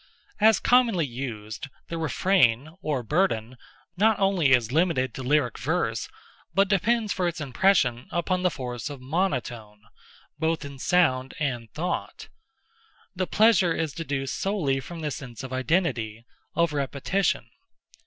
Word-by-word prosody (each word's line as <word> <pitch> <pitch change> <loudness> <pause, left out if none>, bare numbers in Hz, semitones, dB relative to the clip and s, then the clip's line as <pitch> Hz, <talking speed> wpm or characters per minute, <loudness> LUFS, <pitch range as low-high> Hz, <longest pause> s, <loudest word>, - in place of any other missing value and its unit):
As 220 0 +5
commonly 235 -9 +3
used, 120 -1 -6 0.2
the 170 - -3
refrain, 155 -4 +2
or 145 -6 -1
burden, 130 - 0 0.4
not 215 +3 +3
only 190 -8 +3
is 120 -3 +3
limited 150 -6 +1
to - - -6
lyric 130 -2 +1
verse, - - -1 0.5
but 195 +1 +4
depends 215 +2 +1
for 180 -2 0
its 170 0 -3
impression 135 -4 +2
upon 180 +2 -1
the 180 - +3
force 125 -4 -5
of 145 -2 -7
monotone—both 130 - -4
in 140 -1 -9
sound 130 -7 +2
and 120 -7 -3
thought. 175 +4 -4 0.9
The 185 0 -1
pleasure 210 -6 +4
is 160 -4 -2
deduced 140 -4 -3
solely 170 -10 0
from 165 +5 -8
the 150 -1 -2
sense 125 -2 -7
of 130 -1 -6
identity—of 130 - -1
repetition. 140 -1 -1
150 Hz, 130 wpm, -26 LUFS, 125-180 Hz, 0.9 s, As